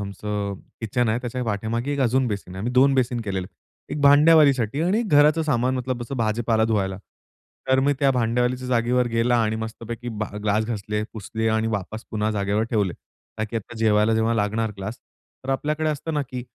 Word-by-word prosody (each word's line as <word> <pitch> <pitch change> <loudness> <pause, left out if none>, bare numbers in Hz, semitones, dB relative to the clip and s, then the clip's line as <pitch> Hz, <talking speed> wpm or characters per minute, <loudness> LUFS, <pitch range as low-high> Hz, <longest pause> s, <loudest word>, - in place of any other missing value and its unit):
आमचं 100 0 -4 0.3
किचन 120 +2 0
आहे, 110 +2 +1
त्याच्या 125 +1 -4
पाठीमागे 115 +5 -2
एक 140 - -2
अजून 130 +1 +2
बेसिन 100 -4 -5
आहे. - - -7
आम्ही 120 +5 -2
2 135 +2 +5
बेसिन 125 -2 +1
केलेले, 95 -3 -3 0.5
एक 150 - -3
भांड्यावालीसाठी 145 -4 +5
आणि 195 +7 +2
घराचं 150 -5 +4
सामान 130 -4 +1
मतलब 125 -1 -3
भाजीपाला 110 0 +1
धुवायला, 100 -4 0 0.7
तर 130 0 +4
मी 145 +2 +3
त्या 140 -1 +4
भांड्यावालीच्या 125 +1 0
जागेवर 125 0 +2
गेला 115 +1 +2
आणि 110 0 0
मस्तपैकी 115 +2 -6
भा 110 -2 -4
ग्लास 105 +1 +1
घासले, 105 -1 -3
पुसले 110 +1 -3
आणि 110 0 +1
वापस 105 +3 -7
पुन्हा 110 0 -1
जागेवर 100 0 0
ठेवले. 105 -6 +1 0.5
ताकी 110 +1 -3
आता 115 +1 -6
जेवायला 110 0 +3
जेव्हा 110 +1 +1
लागणार 110 +1 0
ग्लास, 100 +4 -6 0.5
तर 135 - -3
आपल्याकडे 150 +3 -1
असतं 155 +2 -4
ना, 145 - +1
की 125 -2 -7
115 Hz, 175 wpm, -23 LUFS, 110-130 Hz, 0.7 s, 2